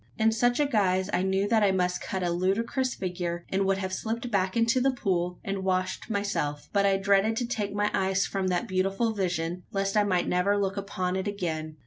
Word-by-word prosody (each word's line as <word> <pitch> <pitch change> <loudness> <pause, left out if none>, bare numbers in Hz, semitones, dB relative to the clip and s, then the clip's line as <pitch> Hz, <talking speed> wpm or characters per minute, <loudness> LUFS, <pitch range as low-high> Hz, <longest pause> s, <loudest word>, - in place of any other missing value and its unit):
In 220 0 +3
such 245 +3 +2
a 295 - +4
guise 195 -7 +1
I - - +2
knew 190 +1 +1
that 225 0 +3
I 200 -2 +4
must 180 -1 0
cut 190 -1 -3
a 175 - 0
ludicrous 225 +9 0
figure, 175 -2 -4
and 195 +1 +1
would 195 0 +2
have 190 -1 -3
slipped 230 +4 -3
back 190 -2 +1
to 230 +2 +2
the 270 - +4
pool, 180 -8 -1
and 195 -1 -3
washed 185 +2 -1
myself; 200 -9 -2
but 200 -1 +3
I 195 -1 +3
dreaded 200 +3 +2
to 245 - -1
take 210 -4 -2
my 205 0 +1
eyes 190 0 +1
from 195 -1 -2
that 180 +5 0
beautiful 195 +4 0
vision, 175 -3 -2
lest 195 0 -1
I 210 - +5
might 185 -3 +1
never 180 +3 +2
look 195 -1 0
upon 185 -2 -2
it 190 +2 -2
again! 160 -6 -3
195 Hz, 220 wpm, -27 LUFS, 185-210 Hz, -, I